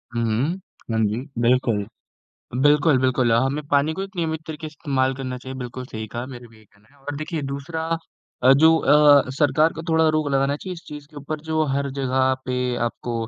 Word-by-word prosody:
हुँ, 115 Hz, -, 0 dB
हुँ, 115 Hz, +6 st, +1 dB, 0.4 s
हाँ 110 Hz, -, 0 dB
जी, 105 Hz, +2 st, -1 dB, 0.2 s
बिल्कुल। 120 Hz, -4 st, +2 dB, 0.8 s
बिल्कुल, 145 Hz, -1 st, +4 dB
बिल्कुल 130 Hz, -2 st, +2 dB
हमें 135 Hz, +6 st, +1 dB
पानी 145 Hz, +2 st, +3 dB
को 195 Hz, -, -4 dB
एक 195 Hz, -1 st, -9 dB
नियमित 160 Hz, -2 st, -1 dB
तरीके 155 Hz, 0 st, -6 dB
से -, -, -16 dB
इस्तेमाल 135 Hz, -3 st, 0 dB
करना 130 Hz, -1 st, -5 dB
चाहिए, 130 Hz, +1 st, -8 dB
बिल्कुल 125 Hz, +1 st, -6 dB
सही 110 Hz, -3 st, -6 dB
कहा, 120 Hz, +3 st, -5 dB
मेरा 120 Hz, -3 st, -10 dB
भी 110 Hz, -, -19 dB
यही 110 Hz, -, -20 dB
कहना 105 Hz, +2 st, -28 dB
है -, -, -24 dB
और 145 Hz, 0 st, -5 dB
देखिए 155 Hz, 0 st, -4 dB
दूसरा 140 Hz, +4 st, -4 dB, 0.6 s
अ, 130 Hz, +1 st, +7 dB
जो 160 Hz, +4 st, +6 dB
अ, 145 Hz, -3 st, +5 dB
सरकार 150 Hz, +3 st, +2 dB
को 160 Hz, -, -7 dB
थोड़ा 160 Hz, 0 st, +3 dB
रोक 155 Hz, -2 st, +1 dB
लगाना 135 Hz, +1 st, +1 dB
चाहिए 185 Hz, +4 st, -7 dB
इस 170 Hz, -, -12 dB
चीज़ 150 Hz, -1 st, -9 dB
के 150 Hz, -, -18 dB
ऊपर 150 Hz, +2 st, -5 dB
जो 155 Hz, 0 st, +1 dB
हर 140 Hz, +1 st, -1 dB
जगह 130 Hz, 0 st, +2 dB
पे 125 Hz, 0 st, -1 dB, 0.3 s
आपको 120 Hz, 0 st, -5 dB
140 Hz, 210 wpm, -23 LUFS, 125-155 Hz, 0.8 s, अ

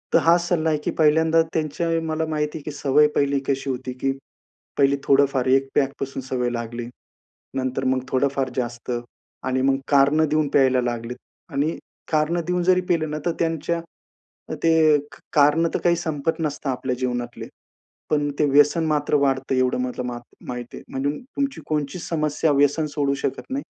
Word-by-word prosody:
तर -, -, +7 dB
हा 165 Hz, +1 st, +5 dB
सल्ला 170 Hz, -2 st, 0 dB
आहे 155 Hz, -, +2 dB
की -, -, -1 dB
पहिल्यांदा 160 Hz, +1 st, +4 dB
त्यांच्या 160 Hz, +2 st, -1 dB, 0.2 s
मला 160 Hz, 0 st, -1 dB
माहिती 150 Hz, 0 st, -2 dB
आहे -, -, -8 dB
की 150 Hz, -, -5 dB
सवय 145 Hz, +1 st, +3 dB
पहिली 140 Hz, 0 st, +2 dB
कशी 135 Hz, 0 st, -1 dB
होती, 130 Hz, 0 st, -3 dB
की 135 Hz, +2 st, -1 dB, 0.7 s
पहिले 140 Hz, 0 st, +4 dB
थोडंफार 135 Hz, -2 st, +3 dB
एक 135 Hz, +1 st, +3 dB
पॅकपासून 135 Hz, -1 st, -1 dB
सवय 125 Hz, -1 st, -1 dB
लागली. 120 Hz, 0 st, -4 dB, 0.7 s
नंतर 130 Hz, 0 st, -2 dB
मग 130 Hz, 0 st, +2 dB
थोडंफार 135 Hz, 0 st, 0 dB
जास्त 120 Hz, -1 st, -3 dB, 0.6 s
आणि 130 Hz, 0 st, +1 dB
मग 135 Hz, 0 st, +3 dB
कारणं 145 Hz, +2 st, +4 dB
देऊन 155 Hz, 0 st, +2 dB
प्यायला 130 Hz, -2 st, +3 dB
लागलेत 120 Hz, 0 st, -3 dB, 0.4 s
आणि 150 Hz, +4 st, 0 dB, 0.3 s
कारणं 160 Hz, +2 st, +1 dB
देऊन 180 Hz, 0 st, 0 dB
जरी 185 Hz, +1 st, +4 dB
पिले 170 Hz, -3 st, +2 dB
ना 150 Hz, -, -3 dB
तर 175 Hz, -, +2 dB
त्यांच्या 165 Hz, +1 st, -1 dB, 0.7 s
अ, -, -, -3 dB
ते 165 Hz, -, +4 dB, 0.3 s
एक 145 Hz, 0 st, -4 dB, 0.2 s
कारणं 150 Hz, +3 st, +4 dB
तर -, -, 0 dB
काही 175 Hz, -1 st, +4 dB
संपत 160 Hz, -1 st, -2 dB
नसतं 150 Hz, -2 st, -2 dB
आपल्या 130 Hz, 0 st, -2 dB
जीवनातले. 120 Hz, -2 st, -3 dB, 0.6 s
पण 145 Hz, -1 st, +1 dB
ते 150 Hz, -, +4 dB
व्यसन 145 Hz, +4 st, +4 dB
मात्र 150 Hz, -1 st, +1 dB
वाढतं, 135 Hz, -2 st, +1 dB
एवढं 130 Hz, 0 st, +2 dB
मला 125 Hz, 0 st, -3 dB
मात 120 Hz, -1 st, -5 dB, 0.3 s
माहिती 125 Hz, -1 st, -6 dB
आहे. -, -, -10 dB
म्हणजे 135 Hz, +2 st, -1 dB, 0.3 s
तुमची 275 Hz, -1 st, -1 dB
कोणची 150 Hz, +2 st, -2 dB
समस्या 155 Hz, -2 st, 0 dB
व्यसन 145 Hz, +3 st, +3 dB
सोडू 140 Hz, -2 st, +1 dB
शकत -, -, -2 dB
नाही. 275 Hz, +2 st, -2 dB
140 Hz, 170 wpm, -23 LUFS, 130-160 Hz, 0.7 s, तर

